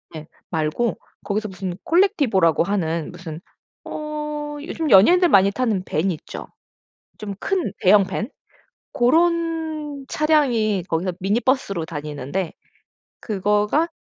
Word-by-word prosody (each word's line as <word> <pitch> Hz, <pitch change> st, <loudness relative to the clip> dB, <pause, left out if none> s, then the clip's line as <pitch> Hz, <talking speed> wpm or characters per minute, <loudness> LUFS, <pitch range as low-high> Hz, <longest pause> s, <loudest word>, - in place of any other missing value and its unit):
예 155 Hz, 0 st, -8 dB, 0.2 s
말고 160 Hz, +8 st, -1 dB, 0.3 s
거기서 215 Hz, +1 st, -1 dB
무슨 185 Hz, -2 st, -5 dB
콜렉티보라고 255 Hz, -, +3 dB
하는 170 Hz, -3 st, -1 dB
무슨 170 Hz, -3 st, -8 dB, 0.5 s
어 300 Hz, -1 st, -5 dB
요즘 320 Hz, 0 st, -3 dB
연예인들 345 Hz, -, +7 dB
많이 195 Hz, -4 st, +5 dB
타는 220 Hz, -5 st, 0 dB
밴 175 Hz, +6 st, 0 dB
있죠. 160 Hz, -, -7 dB, 0.7 s
좀 205 Hz, -2 st, -5 dB
큰 385 Hz, -4 st, -1 dB
대형 195 Hz, +1 st, +6 dB
밴. 210 Hz, +4 st, -3 dB, 0.6 s
고런 320 Hz, 0 st, 0 dB
차량이 245 Hz, -, +2 dB
거기서 175 Hz, +3 st, -1 dB
미니버스로 205 Hz, -2 st, 0 dB
다니는데 150 Hz, +2 st, -4 dB, 0.7 s
그거가 210 Hz, -, +1 dB
210 Hz, 245 characters per minute, -22 LUFS, 180-300 Hz, 0.7 s, 연예인들